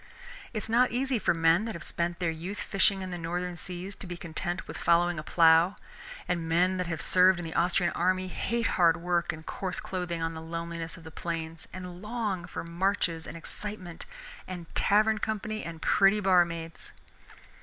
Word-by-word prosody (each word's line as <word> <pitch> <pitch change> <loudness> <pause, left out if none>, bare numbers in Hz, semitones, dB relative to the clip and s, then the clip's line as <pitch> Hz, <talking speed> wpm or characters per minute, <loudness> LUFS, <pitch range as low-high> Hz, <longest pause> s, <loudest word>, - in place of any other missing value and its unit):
It 215 -4 -3
is - - -6
not 240 +3 +4
easy 255 0 0
for - - +2
men 165 +4 +3
that 225 - -4
have 170 - -7
spent 170 0 -2
their 170 -2 0
youth 175 +6 -6
fishing 195 0 +1
in 185 - -5
the 175 - -4
Northern 175 +2 -3
seas 180 +2 -6
to - - -9
be 175 -1 -6
content 175 +1 -4
with - - -7
following 170 -1 +3
a - - -6
plow, 165 +3 +5 0.5
and 170 -2 -1
men 180 +3 +3
that 180 -1 -1
have 165 -2 -3
served 185 0 +5
in 175 - -5
the 160 - -5
Austrian 175 0 +2
army 185 +1 +1
hate 230 +5 -1
hard 175 -4 +4
work 175 -1 0
and 160 0 -10
coarse 185 -2 -3
clothing 180 -2 -3
on 165 0 -2
the 160 - -7
loneliness 165 0 -5
of 165 - -13
the 160 - -10
plains, 165 -1 -5
and 180 -1 -8
long 210 -5 -2
for - - -5
marches 170 -1 0
and 165 - -7
excitement 185 0 -7 0.4
and 180 -2 -6
tavern 215 +1 +3
company 215 0 -3
and 165 -1 -7
pretty 195 +2 +5
barmaids. 170 -4 +1
175 Hz, 190 wpm, -29 LUFS, 165-190 Hz, 0.5 s, plow